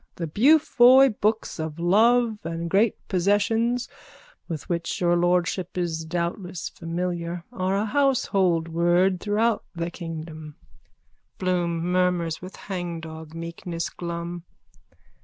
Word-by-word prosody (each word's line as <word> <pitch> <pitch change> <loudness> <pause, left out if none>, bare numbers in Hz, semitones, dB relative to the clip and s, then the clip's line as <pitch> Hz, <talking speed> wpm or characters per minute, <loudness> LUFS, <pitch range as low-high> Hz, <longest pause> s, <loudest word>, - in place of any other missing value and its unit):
The 170 - -3
Beaufoy 265 - +6
books 215 -3 0
of 160 -1 -4
love 220 +6 +3
and 165 0 -4
great 210 +3 +3
possessions, 225 +6 +1 0.6
with 160 -5 -5
which 170 -1 -2
your 175 -1 +3
lordship 175 +1 0
is 165 -2 -2
doubtless 175 +1 -3
familiar, 170 0 -4
are 190 -2 0
a 205 - 0
household 200 - +2
word 175 +3 +2
throughout 215 +2 +1
the 170 0 -3
kingdom. 160 -3 -7 0.8
BLOOM: 175 -2 0
_(Murmurs 180 -2 0
with 185 +1 -9
hangdog 165 -4 -6
meekness 165 0 -5
glum.) 170 0 -5
175 Hz, 110 wpm, -25 LUFS, 170-205 Hz, 0.8 s, Beaufoy